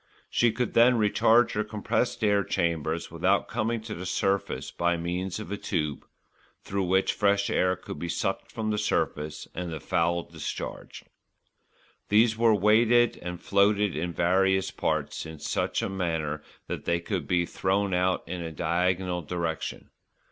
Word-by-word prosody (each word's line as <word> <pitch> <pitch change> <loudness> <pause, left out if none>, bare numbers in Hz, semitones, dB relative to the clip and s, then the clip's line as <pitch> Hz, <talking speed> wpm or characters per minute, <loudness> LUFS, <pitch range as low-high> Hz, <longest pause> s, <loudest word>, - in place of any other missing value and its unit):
She 120 -1 +3
could 125 0 -2
then 120 +1 +6
recharge 110 +3 +4
her 105 - 0
compressed 105 +3 -1
air 100 -1 +3
chambers 85 -2 -1
without 90 +4 +1
coming 115 0 -1
to 110 0 -6
the 90 0 -6
surface 95 +1 -1
by 85 0 0
means 90 +2 -3
of 105 - -7
a 100 - -2
tube, 75 -7 -3 0.6
through 100 -1 -2
which 95 +2 +2
fresh 100 -1 +2
air 90 0 +2
could - - -8
be 85 - -4
sucked - - -2
from 110 -1 -2
the 105 - 0
surface, 75 -5 -1
and 90 -1 -4
the 80 - -4
foul 85 +4 0
discharged. 80 -3 -7 1.0
These 110 +2 +4
were 115 -1 +4
weighted 115 +4 +4
and 90 -1 -5
floated 100 0 +2
in 85 +3 -2
various 95 +2 +2
parts - - -2
in 80 0 -8
such - - -1
a - - 0
manner 80 -5 -2 0.2
that - - -5
they 85 0 +1
could 85 -4 -3
be 85 -1 +2
thrown 95 +2 0
out 90 0 +1
in 90 +1 -4
a 80 -1 -5
diagonal 90 +2 0
direction. 85 0 -4
95 Hz, 160 wpm, -27 LUFS, 85-105 Hz, 1.0 s, then